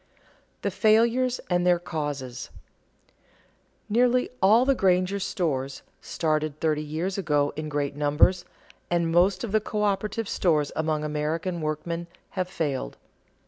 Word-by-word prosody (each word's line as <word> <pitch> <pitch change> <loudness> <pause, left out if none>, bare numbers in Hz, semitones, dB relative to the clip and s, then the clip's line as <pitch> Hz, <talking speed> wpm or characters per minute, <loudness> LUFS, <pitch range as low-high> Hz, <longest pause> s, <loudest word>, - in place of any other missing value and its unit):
[Sidenote: - - -34
The 200 - 0
failures 235 +5 +3
and 175 -1 +1
their 180 -1 +4
causes] 145 -7 -5 1.4
Nearly 250 +3 +2
all 220 +6 +5
the 275 - +4
Granger 190 -3 +2
stores, 140 -9 -2 0.2
started 155 -2 -1
thirty 155 -2 +1
years 165 +6 -3
ago 145 -5 +1
in 155 0 -4
great 145 -1 -2
numbers, 150 +5 +3 0.5
and 170 -1 +1
most 180 +2 +3
of 230 - -4
the 215 0 +2
coöperative 210 +1 -1
stores 155 -8 +1
among 155 -1 -1
American 160 +4 -2
workmen, 165 +3 -3 0.2
have 185 -2 -2
failed. 140 - -3
170 Hz, 130 wpm, -26 LUFS, 150-200 Hz, 1.4 s, all